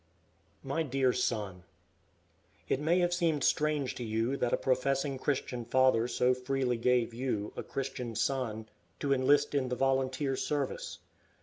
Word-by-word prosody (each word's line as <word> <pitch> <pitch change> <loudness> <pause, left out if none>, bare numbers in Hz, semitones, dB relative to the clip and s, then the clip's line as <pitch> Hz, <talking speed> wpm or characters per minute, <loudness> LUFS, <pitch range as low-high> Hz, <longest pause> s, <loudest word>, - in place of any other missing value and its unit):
MY 140 +4 -1
DEAR 135 -4 +1
SON, 100 -7 -2 1.0
It - - +1
may 160 +4 +2
have 175 0 +2
seemed 165 -5 +1
strange 150 -3 +1
to 125 - -6
you 115 +4 0
that 125 -3 0
a - - +3
professing 135 +1 0
Christian 130 -3 -2
father 125 -1 +3
so 125 +1 +2
freely 125 -1 -1
gave 120 0 +2
you, 115 -4 -2
a - - -4
Christian 130 -4 -4
son, 115 -2 -1 0.3
to 140 -1 +1
enlist 145 +3 +3
in 135 -3 0
the 125 - -1
volunteer 135 +1 0
service. 145 0 -2
130 Hz, 145 wpm, -31 LUFS, 125-140 Hz, 1.0 s, a